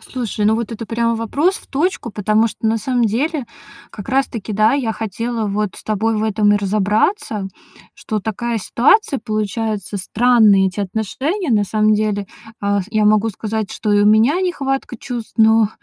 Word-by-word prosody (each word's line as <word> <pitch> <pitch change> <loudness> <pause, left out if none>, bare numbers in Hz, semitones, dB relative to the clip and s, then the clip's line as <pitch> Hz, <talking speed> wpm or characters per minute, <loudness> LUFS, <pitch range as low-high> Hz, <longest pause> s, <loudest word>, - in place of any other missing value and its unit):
Слушай, 230 -4 -4
ну 215 +1 +4
вот 230 0 -3
это 225 0 -6
прямо 230 0 0
вопрос 290 - 0
в - - -12
точку. 295 - -2
Потому 215 +2 +1
что 225 0 -4
на 225 +1 +1
самом 245 +1 0
деле 275 +5 -1 0.4
как 205 - -10
раз 270 +1 +2
таки, 220 -2 -6
да, 215 +3 +3
я 240 -6 -1
хотела 225 +1 -3
вот 205 -2 -2
с - - -10
тобой 220 +1 0
в 215 - -1
этом 210 -1 +2
и 205 - +4
разобраться, 210 - 0 0.5
что 215 -1 -4
такая 230 +3 -3
ситуация 275 - +2
получается, 215 -1 -3
странные 210 -1 +4
эти 195 +3 -6
отношения 260 - -2
на 210 -3 +3
самом 215 +1 +2
деле. 210 -1 -1 0.3
А, 200 0 +1
я 215 -2 +1
могу 215 +1 +3
сказать, 215 +1 -4
что 210 -2 -1
и 205 - +4
у 205 - +4
меня 225 - +4
нехватка 275 -9 -2
чувств, 240 -2 -7
но 220 -1 +5
220 Hz, 180 wpm, -18 LUFS, 210-240 Hz, 0.5 s, но